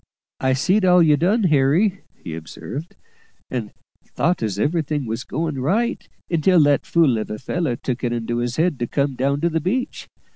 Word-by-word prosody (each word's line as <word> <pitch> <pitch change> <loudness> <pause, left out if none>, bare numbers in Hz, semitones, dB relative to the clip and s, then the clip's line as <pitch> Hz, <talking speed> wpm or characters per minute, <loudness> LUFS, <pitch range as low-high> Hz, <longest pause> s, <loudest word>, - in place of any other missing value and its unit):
"I 130 0 +2
see'd 185 +10 +2
all 180 -1 +6
you 150 -2 +5
done, 195 +9 +2
Harry," 170 +5 +3
he 80 - -8
observed, 140 - -7 0.6
"and - - -3 0.3
thought 175 +1 -1
as 105 -4 -2
everything 150 +2 0
were 110 0 -2
going 155 -2 -2
right, 215 - -1 0.2
until 170 +2 +3
that 145 -1 +2
fool 150 -9 +3
of 110 - -5
a 105 - -4
feller 150 +2 -2
took 125 0 -4
it 120 - 0
into 120 0 -2
his 120 0 -2
head 160 -3 +1
to 120 - -1
come 140 +1 0
down 140 +3 0
to 170 - +2
the 160 0 0
beach. 235 - -2
145 Hz, 185 wpm, -21 LUFS, 125-175 Hz, 0.6 s, all